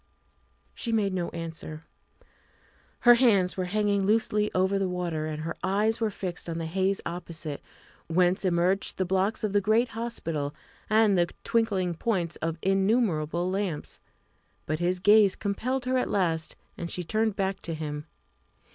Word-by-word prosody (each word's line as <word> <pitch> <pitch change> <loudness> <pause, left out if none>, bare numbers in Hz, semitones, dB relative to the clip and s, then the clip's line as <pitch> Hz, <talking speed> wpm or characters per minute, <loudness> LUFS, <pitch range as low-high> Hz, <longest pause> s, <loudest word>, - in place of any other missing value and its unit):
She 235 - -3
made 205 -4 +1
no 175 -2 -1
answer. 165 -2 -6 1.2
Her 240 -1 +8
hands 215 -7 +3
were 185 - -1
hanging 205 +1 +1
loosely 210 0 +2
over 190 +2 +2
the 190 -1 0
water, 170 -4 -2
and 155 0 -4
her 165 +1 -4
eyes 215 +4 +1
were 220 - +2
fixed 180 -4 -5
on 165 - -3
the 165 - -3
haze 190 +4 0
opposite, 170 -3 -5 0.5
whence 180 +3 +2
emerged 185 +1 +1
the 185 - 0
blocks 190 +4 0
of 210 -2 -1
the 205 - +4
great 220 +5 +2
hospital 165 -11 -3 0.3
and 215 -3 +4
the 175 - +2
twinkling 200 -6 +1
points 175 -3 -1
of 165 +1 -3
innumerable 190 -4 +1
lamps. 190 -5 -3 0.7
But 155 +1 -2
his 180 +1 +1
gaze 205 +1 +5
compelled 245 +6 -2
her 255 0 +2
at - - -1
last, 165 -5 0 0.2
and 170 - -4
she 180 - -3
turned 215 +3 0
back 195 -1 -1
to 165 - -4
him. 150 0 -5
190 Hz, 155 wpm, -27 LUFS, 170-210 Hz, 1.2 s, Her